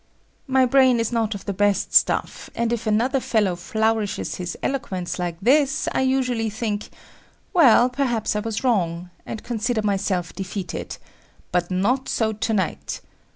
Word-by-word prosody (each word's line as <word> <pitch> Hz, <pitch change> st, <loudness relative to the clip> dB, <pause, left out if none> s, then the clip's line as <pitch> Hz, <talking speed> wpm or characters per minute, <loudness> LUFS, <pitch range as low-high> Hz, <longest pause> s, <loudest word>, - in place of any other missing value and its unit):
My 265 Hz, -1 st, +4 dB
brain 255 Hz, -1 st, +4 dB
is 230 Hz, 0 st, -1 dB
not 225 Hz, -2 st, 0 dB
of 200 Hz, -, -9 dB
the 200 Hz, -, -2 dB
best 205 Hz, +1 st, +1 dB
stuff, -, -, +2 dB
and 235 Hz, 0 st, 0 dB
if 235 Hz, -1 st, -3 dB
another 240 Hz, +6 st, +2 dB
fellow 210 Hz, -7 st, +1 dB
flourishes 220 Hz, +4 st, -1 dB
his 180 Hz, -1 st, -5 dB
eloquence 190 Hz, -11 st, -3 dB
like 175 Hz, -2 st, -3 dB
this, 270 Hz, +6 st, +2 dB
I -, -, 0 dB
usually 250 Hz, -4 st, +1 dB
think, 215 Hz, -1 st, -3 dB, 0.6 s
"Well, 255 Hz, -, +6 dB
perhaps 250 Hz, -5 st, -1 dB
I -, -, +1 dB
was 225 Hz, +2 st, -3 dB
wrong," 180 Hz, -7 st, 0 dB, 0.2 s
and 220 Hz, -, -6 dB
consider 235 Hz, -1 st, -1 dB
myself 195 Hz, -4 st, -1 dB
defeated, 190 Hz, -1 st, -5 dB, 0.5 s
but 175 Hz, -1 st, 0 dB
not 220 Hz, +9 st, 0 dB
so 220 Hz, -1 st, 0 dB
to 215 Hz, +2 st, -2 dB
night. 190 Hz, -6 st, -2 dB
220 Hz, 155 wpm, -23 LUFS, 195-245 Hz, 0.6 s, Well